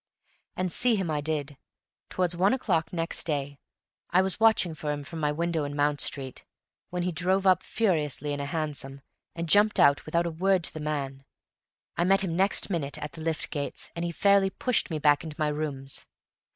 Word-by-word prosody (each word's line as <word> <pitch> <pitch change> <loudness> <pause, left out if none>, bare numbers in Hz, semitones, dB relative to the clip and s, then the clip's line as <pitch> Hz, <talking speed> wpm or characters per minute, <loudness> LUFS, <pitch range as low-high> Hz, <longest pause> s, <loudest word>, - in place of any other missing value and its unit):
And 185 -1 -2
see 245 +4 +3
him 190 -5 -1
I 150 -1 -1
did, 145 -2 -3 0.5
towards 180 -1 0
one 195 +7 +3
o'clock 180 -11 0
next 165 -1 +1
day. 140 -3 -3 0.5
I 180 +2 +4
was 190 +1 0
watching 220 -6 +4
for 150 -1 -4
him 145 -1 -4
from 160 +3 -7
my 150 -1 +1
window 165 0 -1
in 145 0 -4
Mount 145 0 +2
Street, 135 -2 -1 0.5
when 180 0 -2
he 180 - 0
drove 185 +3 0
up 185 -1 +5
furiously 150 - -1
in 145 - -4
a 140 - -3
hansom, 140 -3 -3 0.3
and 170 0 -3
jumped 205 +5 +4
out 140 0 +5
without 170 +2 +1
a 170 - -2
word 185 +2 +1
to - - 0
the 155 - -6
man. 140 -3 -3 0.7
I 175 - +2
met 195 +1 +4
him 170 -3 -2
next 195 +3 +2
minute 145 -6 -2
at 150 - -6
the 160 - -10
lift 160 0 -2
gates, 145 -2 -4
and 170 - -3
he 170 - -2
fairly 200 +2 +3
pushed 250 +4 0
me 160 - -2
back 145 0 +3
into 155 -2 -7
my 155 -2 +1
rooms. 145 -3 -4
160 Hz, 205 wpm, -27 LUFS, 145-185 Hz, 0.7 s, up